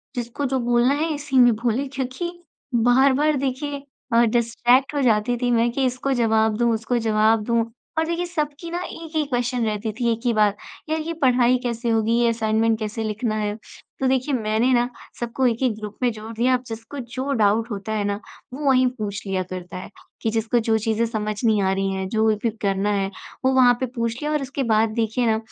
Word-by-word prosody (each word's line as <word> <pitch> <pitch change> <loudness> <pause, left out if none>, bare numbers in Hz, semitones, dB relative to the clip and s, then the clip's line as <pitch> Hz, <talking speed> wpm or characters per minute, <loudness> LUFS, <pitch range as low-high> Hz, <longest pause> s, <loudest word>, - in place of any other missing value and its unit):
जिसको 240 +3 -3
जो 265 0 0
बोलना 240 +2 +3
है 310 +2 0
इसी 290 -2 -2
में 245 -1 +7
बोले 240 +4 -1
क्योंकि 265 +6 -4 0.4
बार-बार 265 +5 +4
देखिए 275 +2 -3 0.3
अ, 230 - +6
डिस्ट्रैक्ट 240 +3 +2
हो 285 - +1
जाती 235 -1 +2
थी 245 -1 +1
मैं 235 0 +3
कि 265 +2 0
इसको 255 +2 -1
जवाब 220 -3 +2
दूँ, 235 0 +2
उसको 225 +2 -1
जवाब 220 -1 +2
दूँ 230 +1 +1 0.3
और 320 - +2
देखिए 340 +2 -2
सबकी 310 -1 -4
ना 350 +1 -2
एक 325 -2 -9
ही 310 - +2
क्वेश्चन 245 -2 -1
रहती 215 0 -2
थी, 235 +1 0
एक 225 - -1
ही 240 - +3
बात। 210 -2 +2 0.3
यार 315 0 0
ये 330 +2 -4
पढ़ाई 250 -1 +4
कैसे 235 -1 -2
होगी? 225 0 +1
ये 240 -1 +3
असाइनमेंट 225 0 +1
कैसे 220 +1 -3
लिखना 215 +1 -2
है? 210 -1 -1 0.4
तो 265 - +1
देखिए 260 +2 +1
मैंने 220 +2 +1
ना 240 0 +2 0.3
सबको 240 +2 -1
एक-एक 240 0 +1
ग्रुप 210 -1 -7
में 245 -1 +2
जोड़ 220 0 -8
दिया 245 +3 +2
अब 250 0 0
जिसको 225 +5 -7
जो 260 +3 -4
डाउट 215 +3 +2
होता 205 +1 -4
है 210 -1 0
ना 200 0 -1 0.3
वो 290 +3 -5
वहीं 255 -1 +5
पूछ 205 -2 -4
लिया 190 -1 -1
करता 185 0 -7
है। 185 - -8 0.3
कि 225 - 0
जिसको 225 +2 +1
जो 225 -1 +1
चीज़ें 220 +1 0
समझ 215 -2 -3
नहीं 220 -3 +3
आ 190 - +2
रही 195 0 -1
हैं, 190 0 -3
जो 220 +1 +1 0.2
भी 235 - +2
करना 200 0 0
है, 195 -1 0 0.4
वो 260 - +4
वहाँ 255 -2 +6
पे 260 - 0
पूछ 230 -1 -1
लिया 300 0 -1
और 300 -1 0
उसके 275 +1 -3
बाद 220 -1 +3
देखिए 230 +1 0
ना 220 -1 +3
235 Hz, 215 wpm, -23 LUFS, 220-260 Hz, 0.4 s, में